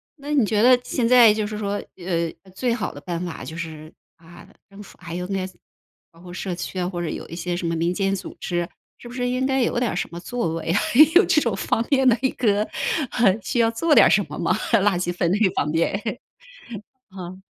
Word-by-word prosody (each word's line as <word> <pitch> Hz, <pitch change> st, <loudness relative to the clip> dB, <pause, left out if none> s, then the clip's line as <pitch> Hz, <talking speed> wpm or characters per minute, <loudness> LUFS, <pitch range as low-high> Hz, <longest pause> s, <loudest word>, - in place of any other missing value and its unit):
那 290 Hz, -1 st, -8 dB
你 270 Hz, -6 st, +4 dB
觉 210 Hz, +1 st, +1 dB
得 250 Hz, 0 st, +6 dB
现 245 Hz, -1 st, -1 dB
在 240 Hz, -3 st, +7 dB
就 215 Hz, 0 st, -2 dB
是 210 Hz, 0 st, -5 dB
说， 205 Hz, -1 st, -2 dB, 0.2 s
呃， 170 Hz, -2 st, -2 dB, 0.2 s
最 240 Hz, +3 st, 0 dB
好 235 Hz, -, -3 dB
的 145 Hz, -, -10 dB
办 170 Hz, +3 st, -4 dB
法 170 Hz, -, -7 dB
就 160 Hz, -, -8 dB
是， 160 Hz, -2 st, -7 dB, 0.2 s
啊， 170 Hz, +1 st, -16 dB, 0.2 s
政 195 Hz, +1 st, -12 dB
府 205 Hz, -, -14 dB
还 170 Hz, -1 st, -7 dB
有 180 Hz, 0 st, -4 dB
呢 195 Hz, -1 st, -2 dB, 0.7 s
包 165 Hz, -, -20 dB
括 175 Hz, 0 st, -11 dB
社 180 Hz, 0 st, -4 dB
区 185 Hz, +1 st, -5 dB
啊， 180 Hz, -, -1 dB
或 175 Hz, -2 st, -4 dB
者 170 Hz, -, -3 dB
有 -, -, -6 dB
一 165 Hz, -, -8 dB
些 175 Hz, +1 st, -3 dB
什 175 Hz, -1 st, -3 dB
么 165 Hz, -, -1 dB
民 170 Hz, +2 st, 0 dB
间 195 Hz, +1 st, 0 dB
组 190 Hz, -, -8 dB
织， 175 Hz, -1 st, -2 dB, 0.3 s
是 -, -, -12 dB
不 240 Hz, -, -10 dB
是 245 Hz, 0 st, -2 dB
应 255 Hz, +1 st, 0 dB
该 265 Hz, -1 st, +1 dB
有 240 Hz, -, 0 dB
点 245 Hz, -2 st, 0 dB
儿 -, -, -4 dB
什 -, -, -2 dB
么 170 Hz, -, -7 dB
作 215 Hz, -4 st, -3 dB
为 165 Hz, 0 st, -3 dB
啊， 195 Hz, -, +2 dB, 0.4 s
有 370 Hz, +3 st, +7 dB
这 305 Hz, -, +3 dB
种 230 Hz, -7 st, 0 dB
方 225 Hz, +4 st, -1 dB
面 265 Hz, -2 st, +4 dB
的 240 Hz, -1 st, +5 dB
一 265 Hz, -, +2 dB
个 210 Hz, -3 st, +1 dB, 0.8 s
需 240 Hz, -, -1 dB
要 230 Hz, -1 st, +4 dB
做 300 Hz, +8 st, +1 dB
点 -, -, +7 dB
什 -, -, +3 dB
么 -, -, -7 dB
吗？ -, -, +1 dB, 0.2 s
垃 205 Hz, -4 st, +3 dB
圾 175 Hz, 0 st, -2 dB
分 175 Hz, -1 st, 0 dB
类 205 Hz, 0 st, +3 dB
方 -, -, 0 dB
面 170 Hz, +6 st, 0 dB, 1.1 s
啊。 185 Hz, -1 st, -9 dB
195 Hz, 255 characters per minute, -23 LUFS, 175-235 Hz, 1.1 s, 在